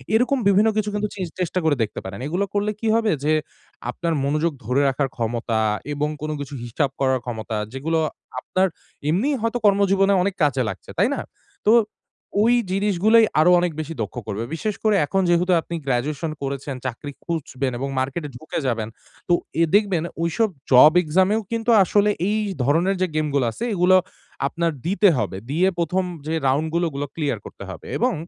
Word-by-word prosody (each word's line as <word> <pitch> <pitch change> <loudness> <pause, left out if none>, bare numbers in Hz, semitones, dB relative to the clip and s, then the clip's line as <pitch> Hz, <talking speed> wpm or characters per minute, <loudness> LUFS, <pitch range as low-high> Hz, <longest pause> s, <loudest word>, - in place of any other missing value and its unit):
এরকম 250 +4 +3
বিভিন্ন 205 +3 +5
কিছু 210 -1 0
কিন্তু 210 0 -1
চিশ 185 -3 -3
চেষ্টা 180 0 0
করে 155 -2 +3
দেখতে 105 - -4
পারেন। 95 +1 -6
এগুলো 180 +6 0
করলে 205 +1 0
কি 225 - -2
হবে 225 -2 +2
যে, 155 - +2 0.6
আপনার 170 -1 -2
মনোযোগ 150 +3 0
ধরে 125 +5 +2
রাখার 135 0 -1
ক্ষমতা 115 -1 -1 0.3
এবং 150 +1 -1
কোনো 155 0 -2
কিছু 145 0 -6
হিসাব 120 +4 -1
করার 130 -1 +2
ক্ষমতা, 110 -2 -4 0.2
যেগুলো 160 +5 -1 0.4
আপনার 185 +8 +1 0.4
এমনিই 250 - +1
হয়তো 230 +2 0
কর্মজীবনে 195 -1 +4
অনেক 195 -1 -1
কাজে 135 -3 +2
লাগছে, - - -8
তাই 205 +8 +3
না? - - -4 0.5
তো 220 - +7 0.7
ওই 235 +2 +4 0.2
জিনিসগুলোই 205 +3 +4
আরো 170 +3 +6
অনেক 175 -1 0
বেশি 155 +1 -6
দক্ষ 105 +1 -4
করবে। 105 +1 -3
বিশেষ 210 +5 -2
করে 215 -1 +3
এখন 195 +6 0
যেহেতু 175 +2 +3
আপনি 170 - -6
গ্র্যাজুয়েশন 140 +5 -1
করেছেন, 140 0 -4
চাকরি 130 +3 -5
খুঁজবেন 135 -5 -3
এবং 135 +1 -2
মার্কেটে 145 +4 -3
ঢুকে 155 - -4
যাবেন। 115 -3 -1 0.4
তো 175 - +3 0.3
এ - - +6
দেখবেন 200 -6 +2 0.2
ওইসব 205 +6 +1 0.2
জব 140 +5 +8
এক্সামেও 190 +7 +2
কিন্তু 230 +1 0
আসলে 205 +3 +3 0.2
এই 215 +1 +1 0.2
ধরনের 165 +9 +2
যে, 185 - +3
গেমগুলো 145 -4 +1
আছে 220 - -7
এগুলো 180 0 +4 0.5
আপনার 170 +2 -1
দিতে 200 +3 +3
হবে। 100 -4 -2
দিয়ে 170 +6 +2
১ম 180 +3 +1 0.2
যে, 160 - -1
রাউন্ডগুলো 160 +5 +1
ওগুলো 140 -1 -4
ক্লিয়ার 145 -9 -1
করতে - - -10
হবে 90 -3 -9
এবং 250 +2 +1
165 Hz, 175 wpm, -22 LUFS, 140-200 Hz, 0.7 s, জব